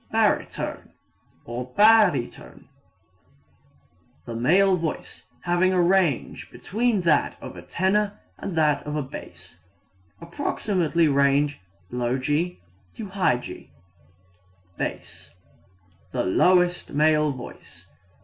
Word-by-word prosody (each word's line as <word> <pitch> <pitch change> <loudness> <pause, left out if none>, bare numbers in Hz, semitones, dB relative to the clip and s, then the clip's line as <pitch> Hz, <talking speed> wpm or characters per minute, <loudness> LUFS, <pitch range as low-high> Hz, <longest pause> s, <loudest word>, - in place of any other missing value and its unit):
Baritone - - -1 0.5
(or 125 +2 -6
barytone) 210 - +3 1.6
the 120 - -6
male 185 +12 +3
voice 165 -3 -5
having 175 +1 +2
a 185 - +2
range 175 -6 +1
between 220 0 -1
that 155 - +2
of - - -9
the 90 - -10
tenor 200 - 0 0.2
and 185 -4 -5
that 150 -2 +3
of 150 - -3
the 150 - -1
bass. 90 - -11 0.6
Approximate 175 - -2
range 140 -2 +3 0.3
G 130 +8 -1 0.4
g'. 190 - -2 1.1
Bass - - -6 0.8
the - - -1
lowest 180 - +2
male 150 0 +3
voice. 95 -8 -11
155 Hz, 90 wpm, -24 LUFS, 130-185 Hz, 1.6 s, barytone